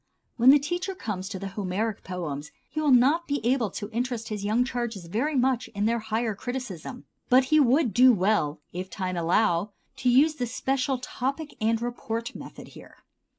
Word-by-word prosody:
When 245 +2 +5
the 285 - +9
teacher 350 +7 -3
comes 195 - -4
to 205 - -5
the 195 +1 -5
Homeric 200 +2 -3
poems 150 -6 -5 0.2
he 310 +3 -4
will 300 - +2
not 275 +7 +4
be 285 0 0
able 245 -3 +2
to 205 +3 -7
interest 240 0 -3
his 210 -2 -4
young 220 +4 +2
charges 235 -7 -4
very 245 - -1
much 255 -1 +1
in 205 +1 0
their 235 +1 +1
higher 220 +1 -1
criticism; 245 0 -6 0.2
but 255 +1 +6
he 310 - +7
would 265 - +3
do 255 +5 +7
well, 185 -7 +1
if 185 +2 -5
time 185 -3 -3
allow, 175 +3 +1 0.2
to 250 - +1
use 280 +6 +5
the 245 - -2
special 265 +2 -1
topic 275 +4 -4
and 225 +1 +1
report 235 -1 -4
method - - -10
here. - - -14
235 Hz, 185 wpm, -26 LUFS, 200-260 Hz, 0.2 s, the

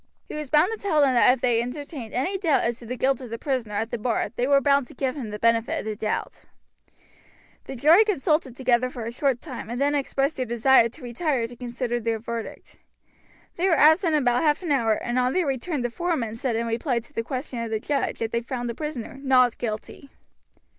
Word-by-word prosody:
He - - -8
was 300 -2 -5
bound 305 +8 +4
to 450 - -4
tell 355 -7 +1
them 275 -3 +4
that 245 - +6
if 255 -1 -1
they 235 -2 +2
entertained 260 -1 -6
any 315 +11 -1
doubt 325 -7 +2
as 235 0 -1
to 235 - -11
the 250 - -3
guilt 265 +1 +1
of 250 - -8
the 230 - -5
prisoner 245 -6 -2
at 220 +3 -2
the 240 - -3
bar 230 +1 -1
they 245 +2 0
were 280 0 +5
bound 280 -2 +2
to - - -14
give 260 +1 -1
him 255 -7 -5
the 210 - -5
benefit 230 +1 +1
of - - -11
the 215 -1 -3
doubt. 210 +1 -4 1.2
The 270 - -7
jury 315 - +6
consulted 305 - 0
together 255 -1 +2
for 240 -3 -7
a 230 - -4
short 260 0 0
time 255 -8 -8
and 240 +1 -4
then 285 +1 +2
expressed 275 +1 0
their 255 - -1
desire 235 +1 +4
to 260 +5 -14
retire 245 +1 -1
to 240 - -12
consider 240 0 -3
their 225 -1 -1
verdict. 230 0 -7 0.8
They 365 +3 +2
were 330 - +3
absent 315 +3 +5
about 245 -4 +2
half 300 +2 +1
an 335 - -2
hour 230 -6 +3
and 240 +3 -1
on 250 +1 +1
their 365 -2 +1
return 275 +1 -2
the 245 - -2
foreman 260 -8 -2
said 240 0 -2
in 230 +1 -1
reply 235 +3 -1
to 235 - -17
the - - -1
question 255 +1 -5
of 230 -1 -3
the 220 -1 -1
judge 280 +5 -1
that 225 0 -3
they 235 - 0
found 240 0 -4
the - - -6
prisoner 270 -2 -6
"Not 255 -3 +3
Guilty." 230 +5 -5
255 Hz, 235 wpm, -25 LUFS, 235-285 Hz, 1.2 s, that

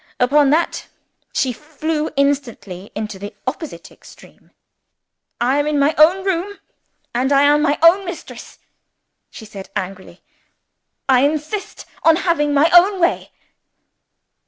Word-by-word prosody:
Upon 280 +3 +3
that 325 +4 0 0.4
she 260 -3 -1
flew 310 +3 -4
instantly 245 -9 -2
into 210 -2 -5
the 205 +2 -8
opposite 255 - -6
extreme. - - -18 0.9
"I 255 +4 +1
am 290 - 0
in 300 -1 0
my 285 +2 +2
own 360 +5 +4
room, 390 +2 -2 0.6
and 255 +3 0
I 280 0 +4
am 295 +1 +4
my 290 -1 +1
own 355 +4 +6
mistress," 355 -2 -9 0.7
she 220 - -11
said 200 -3 -10
angrily. 190 -1 -7 0.8
"I 260 -2 +4
insist 305 +8 -2 0.2
on 325 0 +5
having 295 -4 +1
my 290 +3 +3
own 375 +3 +5
way." 345 0 0
290 Hz, 130 wpm, -19 LUFS, 250-325 Hz, 0.9 s, own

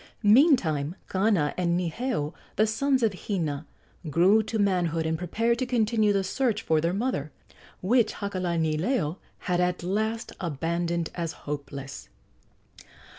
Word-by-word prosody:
Meantime 205 - +4
Kana 190 -6 +1
and 175 -1 +1
Niheu, 180 - -2 0.2
the 215 - +4
sons 260 +4 +1
of 220 -3 +2
Hina, 160 -7 -3 0.4
grew 180 +8 +5
to 220 +1 -3
manhood 175 -5 +1
and 160 0 0
prepared 225 +8 0
to 255 - -1
continue 220 -3 +2
the 195 -1 +1
search 225 +2 0
for 160 -1 +2
their 170 +2 +1
mother, 195 - -2 0.5
which 230 +3 +3
Hakalanileo 175 - -1 0.2
had 180 -2 0
at 180 -1 0
last 220 +5 -1
abandoned 170 +1 -2
as 170 -2 -3
hopeless. 140 -2 -6
180 Hz, 125 wpm, -27 LUFS, 165-220 Hz, 0.5 s, grew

